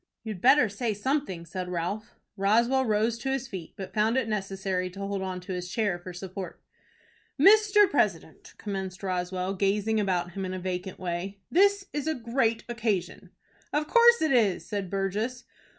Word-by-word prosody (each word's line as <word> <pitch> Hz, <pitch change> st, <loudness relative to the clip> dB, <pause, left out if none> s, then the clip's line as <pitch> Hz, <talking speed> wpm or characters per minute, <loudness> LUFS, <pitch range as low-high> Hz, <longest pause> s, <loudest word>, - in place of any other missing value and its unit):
"You'd 215 Hz, -5 st, -6 dB
better 260 Hz, 0 st, +6 dB
say 215 Hz, +1 st, -2 dB
something," 210 Hz, -, -2 dB
said 180 Hz, +2 st, -5 dB
Ralph. 180 Hz, +5 st, -4 dB, 0.2 s
Roswell 235 Hz, +6 st, +2 dB
rose 220 Hz, +2 st, +1 dB
to 265 Hz, -, -3 dB
his 265 Hz, -1 st, -1 dB
feet, 185 Hz, -9 st, -8 dB
but 190 Hz, -2 st, -7 dB
found 220 Hz, +3 st, +2 dB
it 260 Hz, -4 st, +1 dB
necessary 195 Hz, -3 st, -2 dB
to 190 Hz, +2 st, -11 dB
hold 200 Hz, 0 st, -3 dB
on 185 Hz, -1 st, -3 dB
to 185 Hz, +1 st, -6 dB
his 180 Hz, 0 st, -4 dB
chair 200 Hz, -3 st, 0 dB
for 180 Hz, +1 st, -8 dB
support. 185 Hz, +1 st, -7 dB, 0.8 s
"Mr. 415 Hz, +3 st, +6 dB
President," -, -, -1 dB
commenced 190 Hz, -3 st, -5 dB
Roswell, 185 Hz, 0 st, -2 dB
gazing 205 Hz, +3 st, +1 dB
about 180 Hz, -4 st, 0 dB
him 195 Hz, +2 st, -5 dB
in 185 Hz, 0 st, -3 dB
a -, -, -4 dB
vacant 185 Hz, +1 st, -4 dB
way, 185 Hz, +2 st, -4 dB
"this 400 Hz, +2 st, +4 dB
is 295 Hz, 0 st, -3 dB
a 315 Hz, -, +1 dB
great 230 Hz, -1 st, 0 dB
occasion." 220 Hz, -6 st, -2 dB, 0.4 s
"Of 300 Hz, +1 st, 0 dB
course 475 Hz, +1 st, +6 dB
it 315 Hz, -, +2 dB
is," 220 Hz, -8 st, +2 dB
said 200 Hz, -3 st, -4 dB
Burgess. 210 Hz, +6 st, -2 dB
200 Hz, 170 wpm, -27 LUFS, 185-240 Hz, 0.8 s, better